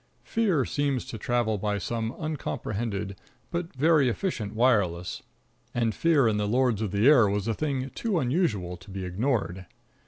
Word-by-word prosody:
Fear 190 - +1
seems 140 -3 -1
to 115 - -7
travel 115 -2 0
by 105 +1 -1
some 115 +4 -3
uncomprehended 110 - -3 0.3
but 170 0 -3
very 150 -1 +4
efficient 115 - -3
wireless, 100 -8 +1 0.5
and 115 -2 +1
fear 155 -4 +3
in 110 -2 +1
the 105 0 0
lords 120 -1 +2
of 110 - -1
the 100 +5 +2
air 125 -9 +7
was 100 +1 -1
a 115 - +1
thing 135 0 -2
too 220 -6 -1
unusual 120 - 0
to 95 +3 -16
be 95 -1 -5
ignored. 95 -3 -1
115 Hz, 160 wpm, -27 LUFS, 100-140 Hz, 0.5 s, air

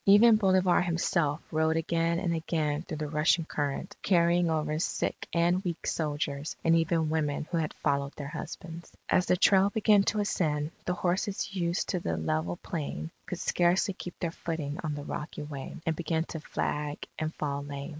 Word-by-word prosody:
Even 215 +3 +8
Bolivar 185 -4 +4
himself 170 -3 +1
rode 160 0 +2
again 165 +1 +1
and 170 -1 0
again 155 -2 -1
through 165 -2 -6
the 150 0 -3
rushing 155 +2 +2
current, 145 +2 -3
carrying 175 -2 +3
over 155 -1 0
sick - - -2
and 175 +2 +2
weak 175 -3 -3
soldiers 145 -1 -2
and 165 0 +5
even 165 -1 +2
women 150 -1 0
who 170 - +1
had 155 -2 -1
followed 140 0 +1
their 140 -2 -6
husbands. 165 +2 -7 0.2
As 180 - +3
the 180 - +3
trail 195 +1 +5
began 210 -1 +4
to 215 - +1
ascend, 155 -7 0
the 180 - 0
horses 190 +3 -1
used 175 -2 -1
to 180 - 0
the 85 - -2
level 80 +2 -1
plain, 140 - -4 0.2
could - - -4
scarcely 180 +3 +2
keep 180 -1 -8
their 170 - -2
footing 160 -3 -4
on 155 -2 -2
the 145 - -5
rocky 150 +1 -5
way, 140 -2 -7
and 165 - +1
began 160 0 0
to 160 - -4
flag 150 -1 -3
and 155 0 -1
fall 140 -1 -2
lame. 140 0 -6
160 Hz, 180 wpm, -29 LUFS, 150-175 Hz, 0.2 s, Even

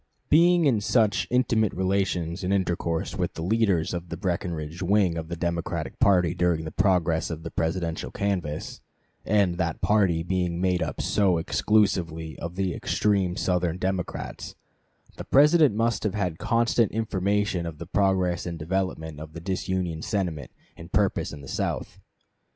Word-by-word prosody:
] - - -46
Being 170 +2 +5
in 120 -7 +3
such 110 -1 +2
intimate 120 -4 +2
relations 95 -2 -1
and 90 - -1
intercourse 85 -4 -1
with - - -2
the 80 - -5
leaders 95 -4 +1
of 85 0 -5
the 85 - -5
Breckinridge 85 -3 -3
wing 95 -2 +2
of 80 -1 -4
the 85 - -4
Democratic 85 -3 -3
party 90 -4 +4
during 85 -2 0
the 80 - -5
progress 90 -3 +1
of 80 -1 -6
the 80 - -6
Presidential 80 0 -2
canvass, 90 -7 -3 0.5
and 95 -4 +2
that 85 -3 -1
party 90 -4 +2
being 90 -1 -1
made 90 -1 +1
up - - -3
so 95 -4 +2
exclusively 85 -4 +1
of 85 +1 -6
the 95 -2 -1
extreme 95 -4 0
Southern 90 -2 0
Democrats, 95 -1 -4 0.6
the - - -5
President 150 -3 +5
must 115 +1 +1
have 105 -2 -1
had 90 -6 -2
constant 115 -1 +2
information 100 -4 0
of 80 -2 -7
the 85 - -7
progress 90 -2 +1
and 85 -1 -4
development 80 -2 -3
of 80 0 -9
the 85 - -7
disunion 90 -2 -2
sentiment 85 - -2 0.3
and - - -12
purpose - - +1
in 75 - -9
the 70 - -11
South. - - -3
90 Hz, 160 wpm, -26 LUFS, 85-100 Hz, 0.6 s, Being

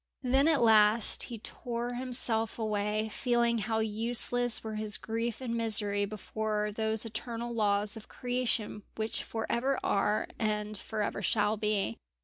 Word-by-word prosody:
Then 265 +4 +3
at 310 -6 +3
last 220 0 +5
he 235 - -7
tore 240 +2 -5
himself 240 -3 0
away, 215 -1 -1
feeling 235 0 +1
how 220 +1 -1
useless 230 +2 +3
were 220 -1 -5
his 215 0 0
grief 230 +2 -3
and 235 -3 -3
misery 210 -3 +2
before 210 +1 -3
those 220 +1 -1
eternal 230 +1 -5
laws 205 -1 +1
of 220 - -10
creation 245 -4 -2
which 220 0 -2
for 225 -1 -4
ever 265 +3 0
are, 210 +1 +1
and 210 -1 -1
for 210 +2 -3
ever 200 - -3
shall 210 +2 +1
be. 210 - -1
220 Hz, 145 wpm, -30 LUFS, 210-235 Hz, -, last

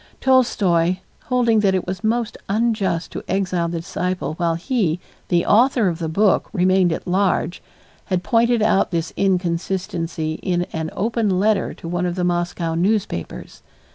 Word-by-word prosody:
Tolstoy, 185 -10 +3 0.3
holding 240 -3 +2
that 195 -2 +2
it 185 - -1
was 185 0 -5
most 230 +1 0
unjust 200 -5 0
to - - -6
exile 185 -3 0
the 165 -1 -3
disciple 180 0 -3
while 165 0 0
he, 180 - 0 0.3
the 175 -1 +2
author 235 0 +4
of 165 -1 -4
the 165 -2 -2
book, 200 +5 +2
remained 185 -2 +3
at - - -4
large, 185 -1 0 0.4
had 185 -2 -1
pointed 230 +2 +2
out 215 -3 +3
this 165 -2 -2
inconsistency 175 -3 -1
in 175 -2 0
an 160 -1 -3
open 215 -3 0
letter 210 -1 +1
to - - -9
one 175 +1 -1
of 175 - -3
the 180 - -1
Moscow 175 -1 -1
newspapers. 185 - -2
185 Hz, 155 wpm, -21 LUFS, 170-210 Hz, 0.4 s, author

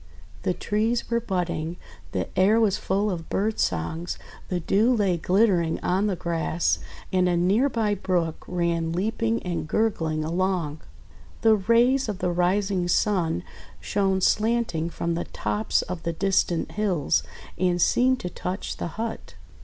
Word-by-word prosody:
The - - 0
trees 225 +3 -1
were 235 - +3
budding, 175 -5 -2 0.3
the - - -2
air 195 +4 +4
was 210 -3 +2
full 200 +2 0
of 165 -3 -5
bird 215 +2 0
songs, 125 - -1 0.3
the 180 - 0
dew 210 +8 +2
lay 200 -5 +2
glittering 180 -1 +2
on 190 +4 +1
the 195 - 0
grass, 170 0 0 0.3
and 185 -1 +3
a 175 - +2
near 200 +11 +3
by 220 -4 0
brook 180 -5 -1
ran 170 -2 0
leaping 225 +5 0
and 175 -3 -3
gurgling 160 -6 0
along. 170 -2 -1 0.6
The 225 -1 +6
rays 235 +5 +3
of 205 - -3
the 180 -1 -1
rising 180 +1 +1
Sun 175 - +1 0.4
shone 190 - 0
slanting 215 -7 +1
from 170 0 -2
the 170 - -2
tops 105 +1 -1
of 180 -2 -6
the 170 - -2
distant 180 -1 +1
hills, 170 - +1 0.4
and 180 -1 +2
seemed 255 +8 +3
to 180 - -3
touch 185 +2 -4
the - - -3
hut. 225 0 -5
185 Hz, 150 wpm, -25 LUFS, 170-210 Hz, 0.6 s, The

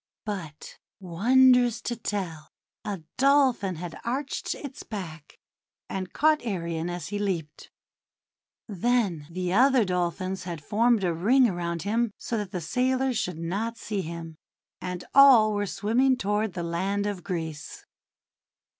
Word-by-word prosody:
But, 170 -8 -7 0.2
wondrous 240 +6 +4
to 240 - -2
tell, 190 -8 -4 0.3
a 195 -5 -5 0.2
Dolphin 265 -9 +3
had 170 +1 -7
arched 270 +4 -3
its 275 -3 -8
back, 165 -8 -8 0.5
and 185 -1 -5
caught 310 -2 +2
Arion 170 -6 -3
as 175 0 -5
he 205 0 -3
leaped. 170 -7 -3 1.0
Then 200 -7 0
the 180 +1 -3
other 255 +1 +5
Dolphins 185 +1 -2
had 170 -4 -6
formed 230 0 +2
a 175 -2 +1
ring 240 +10 +4
around 170 -3 -3
him 230 +3 +1
so 235 - -4
that 205 -3 -3
the 185 -2 -4
sailors 255 - 0
should 180 -5 -3
not 200 +8 -3
see 210 -3 -3
him; 165 -1 -7 0.4
and 180 -1 -5
all 255 -6 +7
were 205 0 -1
swimming 235 +7 +2
toward 210 -1 -1
the 175 - -4
land 190 +4 -1
of 200 -4 -3
Greece. 160 -5 -5
200 Hz, 135 wpm, -26 LUFS, 175-235 Hz, 1.0 s, all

